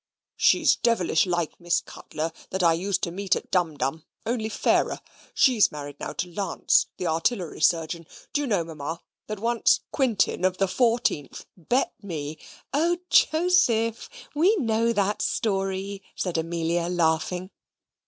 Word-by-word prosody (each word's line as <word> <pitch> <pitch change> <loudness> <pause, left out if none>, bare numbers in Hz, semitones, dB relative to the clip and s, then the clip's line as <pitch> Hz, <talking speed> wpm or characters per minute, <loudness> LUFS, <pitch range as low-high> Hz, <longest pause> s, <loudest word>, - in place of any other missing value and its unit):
"She's - - +4
devilish 195 -7 +2
like 175 -3 -2
Miss 175 -1 +1
Cutler 155 +2 -6 0.2
that 190 0 -2
I 165 -1 +5
used 185 +3 -1
to 170 - -1
meet 195 +2 0
at - - -7
Dumdum, 160 -4 0 0.2
only 225 -2 -1
fairer. - - +1 0.4
She's 245 -6 +4
married 145 -1 -8
now - - -5
to 180 - -3
Lance, 195 -1 +2
the 180 - -4
Artillery 165 +1 -1
Surgeon. 165 0 +1 0.3
Do 295 - +1
you 285 - -2
know, 200 -7 +1
Ma'am, 160 0 -5 0.3
that 215 - -4
once 230 +3 +2
Quintin, 240 -9 +1
of 185 0 +2
the 195 - +2
14th, 225 - 0
bet 240 - 0
me 155 -6 -5 0.2
" - - -27
"O 335 +5 +2
Joseph, 315 - +3 0.2
we 350 +9 +4
know 230 - +1
that 205 -2 0
story," 195 -1 -1
said 180 -3 -3
Amelia, 170 +1 -1
laughing. 175 +2 0
185 Hz, 145 wpm, -25 LUFS, 165-230 Hz, 0.4 s, I